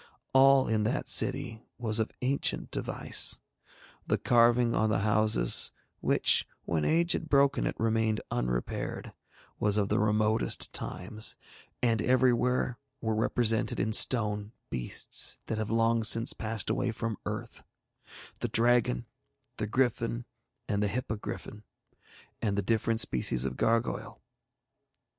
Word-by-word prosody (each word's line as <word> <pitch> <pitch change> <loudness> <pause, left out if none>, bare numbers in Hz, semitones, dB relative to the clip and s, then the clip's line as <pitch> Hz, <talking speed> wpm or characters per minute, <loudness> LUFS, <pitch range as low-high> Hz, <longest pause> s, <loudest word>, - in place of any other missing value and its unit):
All 135 0 +5
in 110 -1 +1
that - - -2
city 110 -1 +1 0.2
was 115 -2 -1
of 110 - -1
ancient 135 +2 -1
device; - - +1 0.7
the - - +1
carving 120 0 +3
on 110 -1 +1
the 100 -2 0
houses, 105 - +3 0.3
which, - - +2 0.2
when 80 -3 -1
age 170 - +2
had 160 - -2
broken 140 0 +3
it, - - -3
remained 110 -1 0
unrepaired, - - -3 0.5
was 105 0 +1
of 100 -2 0
the - - +1
remotest 105 +1 +1
times, 110 +4 -3 0.5
and 115 -3 +2
everywhere 125 0 +1 0.2
were 110 -2 -2
represented 110 0 0
in 110 +1 -1
stone 105 -3 +2 0.2
beasts 60 -1 +1
that 110 - -3
have 110 - -3
long 115 0 +2
since 115 +1 +3
passed 110 -1 -2
away 125 - -1
from 115 -1 -4
Earth - - -6 0.8
the - - -2
dragon, 115 - +2 0.5
the 105 - -2
griffin, 120 0 -1 0.4
and 100 -1 -1
the 105 - +1
hippogriffin, 105 -2 -5 0.8
and 100 -3 -1
the 100 - 0
different 115 0 0
species 65 - +1
of 65 -1 -3
gargoyle. 115 - -1
110 Hz, 130 wpm, -29 LUFS, 105-120 Hz, 0.8 s, All